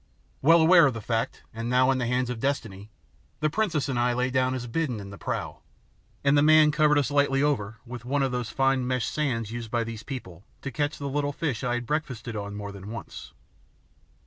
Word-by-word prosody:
Well 165 +4 +6
aware 170 -1 +7
of 130 - -2
the - - -4
fact 115 +1 -2
and 115 +1 -4
now 130 +1 +4
in 130 - 0
the 120 - -1
hands 125 0 0
of 120 - -5
destiny, 110 -7 -3 0.5
the 155 0 +1
princess 165 -8 0
and 130 -3 -1
I 120 0 +2
lay 125 +1 0
down 130 0 +1
as 125 -1 -4
bidden 125 -1 -2
in 100 -1 -8
the 100 - -9
prow, - - -4 0.6
and 140 0 +4
the 145 - +5
man 155 0 +6
covered 150 -1 +3
us 145 -1 +1
lightly 140 -1 +2
over 115 -7 0
with 120 -1 -8
one 140 +3 0
of 135 - 0
those 125 -2 -2
fine 135 -2 +1
meshed 125 -3 -1
seines 115 -8 -1
used 115 -1 -5
by 120 0 0
these 115 -2 -6
people 105 - -8 0.2
to 140 - -4
catch 145 +5 -1
the 140 - -6
little 145 +1 -1
fish 140 -6 -2
I 120 -1 0
had 120 0 -3
breakfasted 125 -5 -3
on 100 -1 -5
more 100 0 -6
than 100 0 -9
once. 115 -2 -8
130 Hz, 225 wpm, -26 LUFS, 115-145 Hz, 0.6 s, aware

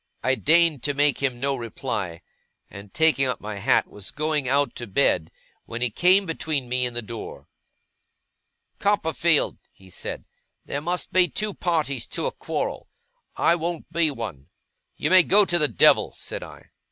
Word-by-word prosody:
I 130 - +2
deigned 160 0 +3
to 145 +2 -2
make 145 -1 +2
him 130 -3 -1
no 140 +1 0
reply; 110 -8 -5 0.5
and, 100 0 -11
taking 150 -2 +2
up 125 - -2
my 105 -1 -6
hat, 115 +6 +2
was 100 -2 -9
going 150 -2 -1
out 140 -1 +2
to 120 - -6
bed, 95 - +1 0.4
when 120 +1 -4
he 125 - 0
came 185 - +4
between 155 -5 -2
me 125 0 0
and 120 - -7
the 120 - -3
door. 115 +1 -8 1.3
'Copperfield,' 165 -5 +1
he 95 -1 -17
said, - - -5 0.4
'there 140 - -4
must 175 +3 -3
be 185 -1 +5
two 210 +3 -3
parties 155 -9 -1
to - - -3
a - - 0
quarrel. - - -4 0.5
I 165 - +3
won't 170 0 -4
be 165 -2 +3
one.' 105 - -6 0.5
'You - - -1
may 185 0 +8
go 200 +4 +5
to 175 -2 +1
the 150 - +4
devil!' 110 -10 +4
said - - -6
I. - - -12
140 Hz, 170 wpm, -24 LUFS, 120-165 Hz, 1.3 s, may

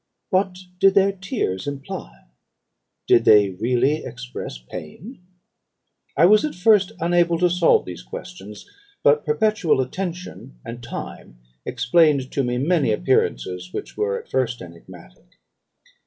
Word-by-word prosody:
What 185 -1 +1 0.2
did 195 0 +5
their 195 0 +4
tears 195 - -3
imply? 135 - -7 0.8
Did 115 - +4
they 105 -3 +5
really 125 +9 0
express 125 - -7
pain? 90 - -10 1.0
I 160 - +6
was 210 +3 +5
at 305 - -3
first 195 +1 +3
unable 170 0 +2
to 175 +1 +2
solve 175 -1 +3
these 90 -5 -8
questions; 95 +11 -10 0.4
but 145 +1 +4
perpetual 170 0 +1
attention 175 - -5
and 120 +1 -7
time 120 - -8 0.3
explained 140 0 +2
to 140 - 0
me 125 0 -1
many 145 -2 +1
appearances 90 - -1
which - - -6
were 100 -2 -1
at - - -15
first 125 -2 -1
enigmatic. 85 -9 -14
135 Hz, 125 wpm, -22 LUFS, -, 1.0 s, I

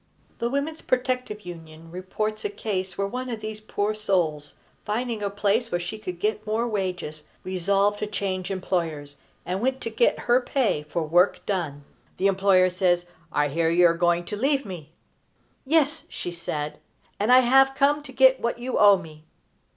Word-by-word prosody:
The 235 - 0
Women's 285 +4 -2
Protective 250 -4 -1
Union 165 -2 -11
reports 215 +4 -3
a 420 - -1
case 190 - -4
where 200 - 0
one 250 +5 -4
of 230 -3 -4
these 215 0 -6
poor 215 0 -1
souls, 170 -8 -1 0.3
finding 225 +1 -2
a 200 - -1
place 205 +4 0
where 175 - +1
she 175 +5 -6
could 180 -4 -6
get 215 +3 -2
more 225 +3 0
wages, 180 -8 -3 0.2
resolved 195 +3 +1
to 210 - -2
change 190 -3 -3
employers, 165 -7 -3 0.3
and 185 +3 -2
went 260 +2 0
to 230 - -4
get 225 +2 +2
her 245 +2 +3
pay 245 - 0
for 170 - -1
work 175 +5 +2
done. 160 -8 -2 0.3
The 190 - -1
employer 190 -1 +4
says: 175 -1 +1 0.3
"I 145 -2 +1
hear 165 +3 +1
you 175 +1 +4
are 170 - +5
going 175 0 +1
to 210 - -4
leave 275 +4 +1
me?" 170 -6 -8 0.8
"Yes," 310 +1 +2
she 175 - -5
said, 150 -3 -4 0.4
"and 210 +4 +2
I 255 +1 +8
have 270 +2 +4
come 290 +2 +3
to 285 -2 -11
get 260 0 +5
what 235 - -1
you 250 +2 -2
owe 205 -1 +7
me." 155 -3 -12
200 Hz, 180 wpm, -25 LUFS, 175-235 Hz, 0.8 s, I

